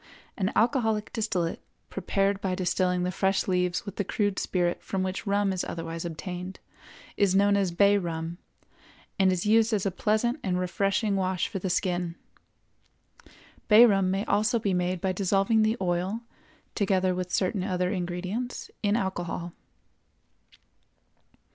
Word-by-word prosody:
An 195 Hz, -3 st, -1 dB
alcoholic 220 Hz, -3 st, +1 dB
distillate, 185 Hz, -7 st, -1 dB, 0.3 s
prepared 195 Hz, 0 st, 0 dB
by 185 Hz, -2 st, -1 dB
distilling 180 Hz, 0 st, 0 dB
the 180 Hz, -, -1 dB
fresh 190 Hz, +1 st, 0 dB
leaves 180 Hz, -1 st, 0 dB
with 200 Hz, -1 st, -8 dB
the 205 Hz, -, +1 dB
crude 205 Hz, 0 st, -1 dB
spirit 175 Hz, -1 st, 0 dB
from 190 Hz, -1 st, -2 dB
which 190 Hz, +2 st, -4 dB
rum 200 Hz, -1 st, +2 dB
is 185 Hz, -, -2 dB
otherwise 165 Hz, 0 st, -5 dB
obtained, 180 Hz, +3 st, -6 dB, 0.6 s
is 195 Hz, -2 st, +3 dB
known 200 Hz, +1 st, +4 dB
as 195 Hz, -2 st, +2 dB
bay 200 Hz, +4 st, +4 dB
rum, 165 Hz, -1 st, -4 dB, 0.8 s
and 190 Hz, -1 st, +5 dB
is 180 Hz, 0 st, -1 dB
used 225 Hz, +2 st, +4 dB
as 205 Hz, -2 st, 0 dB
a 195 Hz, -, +1 dB
pleasant 220 Hz, -, 0 dB
and 180 Hz, -5 st, -1 dB
refreshing 195 Hz, +3 st, 0 dB
wash 185 Hz, -2 st, 0 dB
for 195 Hz, -, -5 dB
the 185 Hz, -, -3 dB
skin. 175 Hz, -1 st, -1 dB, 1.5 s
Bay 225 Hz, +2 st, +9 dB
rum 195 Hz, -4 st, +3 dB
may 195 Hz, +2 st, -1 dB
also 215 Hz, +3 st, +2 dB
be 205 Hz, -4 st, -1 dB
made 180 Hz, 0 st, -1 dB
by 190 Hz, -, +1 dB
dissolving 195 Hz, +3 st, +2 dB
the 220 Hz, +2 st, +2 dB
oil, 185 Hz, +4 st, -1 dB, 0.5 s
together 190 Hz, -3 st, +1 dB
with 180 Hz, 0 st, -4 dB
certain 185 Hz, 0 st, 0 dB
other 180 Hz, -2 st, 0 dB
ingredients, 185 Hz, +6 st, -4 dB
in 205 Hz, 0 st, +2 dB
alcohol. 175 Hz, -3 st, -3 dB
190 Hz, 150 wpm, -27 LUFS, 180-205 Hz, 1.5 s, Bay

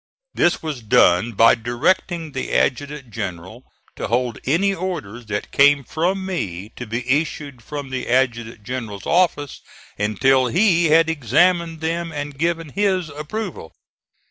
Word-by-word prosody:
This 175 Hz, -, +1 dB
was 150 Hz, -6 st, -4 dB
done 105 Hz, 0 st, +3 dB
by 115 Hz, +3 st, +6 dB
directing 150 Hz, +8 st, -1 dB
the 135 Hz, -1 st, -4 dB
adjutant 140 Hz, -1 st, -1 dB
general 95 Hz, +6 st, -6 dB, 0.3 s
to -, -, -3 dB
hold 120 Hz, -1 st, -1 dB
any 190 Hz, +9 st, +2 dB
orders 125 Hz, -, -5 dB
that 105 Hz, -1 st, -4 dB
came 140 Hz, 0 st, +5 dB
from 185 Hz, +8 st, -1 dB
me 100 Hz, -, -4 dB
to 120 Hz, -, -7 dB
be 120 Hz, +3 st, -4 dB
issued 140 Hz, -2 st, -1 dB
from 140 Hz, +2 st, -7 dB
the 130 Hz, -2 st, -4 dB
adjutant 120 Hz, -3 st, 0 dB
general's 110 Hz, -5 st, -6 dB
office 165 Hz, -5 st, +1 dB, 0.4 s
until 125 Hz, +6 st, +2 dB
he 175 Hz, -, +3 dB
had 160 Hz, +1 st, +5 dB
examined 165 Hz, -, +1 dB
them 165 Hz, +1 st, -2 dB
and 145 Hz, -2 st, -5 dB
given 165 Hz, -1 st, -1 dB
his 185 Hz, -1 st, 0 dB
approval. 155 Hz, -, -6 dB
140 Hz, 140 wpm, -21 LUFS, 120-165 Hz, 0.4 s, by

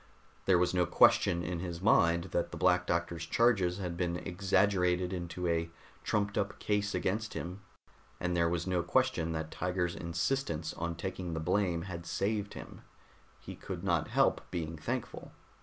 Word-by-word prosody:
There 95 Hz, -2 st, +5 dB
was 90 Hz, +1 st, +2 dB
no 90 Hz, -1 st, +2 dB
question 85 Hz, +2 st, +4 dB
in 85 Hz, 0 st, -3 dB
his 85 Hz, -1 st, -4 dB
mind 85 Hz, -3 st, +3 dB
that 85 Hz, -, 0 dB
the 85 Hz, -, -7 dB
Black 90 Hz, +1 st, +3 dB
Doctor's 85 Hz, 0 st, -1 dB
charges 100 Hz, -7 st, +3 dB
had 90 Hz, -3 st, -4 dB
been 85 Hz, -1 st, -1 dB
exaggerated 90 Hz, -1 st, +1 dB
into 90 Hz, 0 st, -4 dB
a 85 Hz, 0 st, 0 dB, 0.3 s
trumped 100 Hz, -1 st, 0 dB
up 100 Hz, 0 st, -2 dB
case 105 Hz, -1 st, 0 dB
against 105 Hz, +3 st, -1 dB
him, 90 Hz, +3 st, -5 dB, 0.6 s
and 90 Hz, 0 st, -1 dB
there 85 Hz, -1 st, +3 dB
was 85 Hz, 0 st, -1 dB
no 90 Hz, -2 st, +1 dB
question 85 Hz, -4 st, +1 dB
that 80 Hz, 0 st, -4 dB
Tiger's 90 Hz, -1 st, -1 dB
insistence 85 Hz, -, -2 dB
on 85 Hz, 0 st, -3 dB
taking 90 Hz, -1 st, -4 dB
the -, -, -2 dB
blame 85 Hz, 0 st, +1 dB
had 85 Hz, -2 st, -7 dB
saved 105 Hz, 0 st, -1 dB
him; -, -, -9 dB, 0.6 s
he -, -, -9 dB
could 90 Hz, -2 st, -7 dB
not 85 Hz, -5 st, +1 dB
help -, -, +2 dB
being 80 Hz, -1 st, -3 dB
thankful. 75 Hz, -, -5 dB
90 Hz, 165 wpm, -32 LUFS, 85-95 Hz, 0.6 s, There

